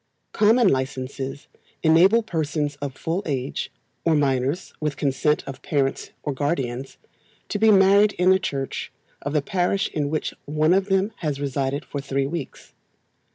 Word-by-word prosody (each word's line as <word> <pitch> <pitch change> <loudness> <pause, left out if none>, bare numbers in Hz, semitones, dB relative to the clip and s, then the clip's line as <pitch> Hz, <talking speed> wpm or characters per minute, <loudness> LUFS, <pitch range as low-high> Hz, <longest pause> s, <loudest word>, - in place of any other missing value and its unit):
Common 225 +2 +4
Licences 135 -1 -2 0.4
enable 180 +8 +5
persons 155 -6 -2
of 140 -2 -5
full 170 +4 -2
age, 135 -2 -3 0.3
or 165 -2 +3
minors 140 +3 0
with 150 -3 -2
consent 145 +2 +1
of 135 -1 -8
parents 135 -2 -1
or 145 - -2
guardians, 135 -3 -2 0.5
to 205 - -2
be 220 +1 +5
married 200 +1 +6
in 180 +2 +3
the 190 - +5
church 135 -6 -4 0.3
of 145 - -4
the 150 -2 +1
parish 190 +4 0
in 145 -2 -2
which 155 0 -2
one 155 +3 +2
of 195 +1 +2
them 195 +2 +1
has 150 -5 -3
resided 140 0 -2
for 140 - -5
three 135 0 -1
weeks. 150 -1 -6
150 Hz, 155 wpm, -23 LUFS, 135-185 Hz, 0.5 s, married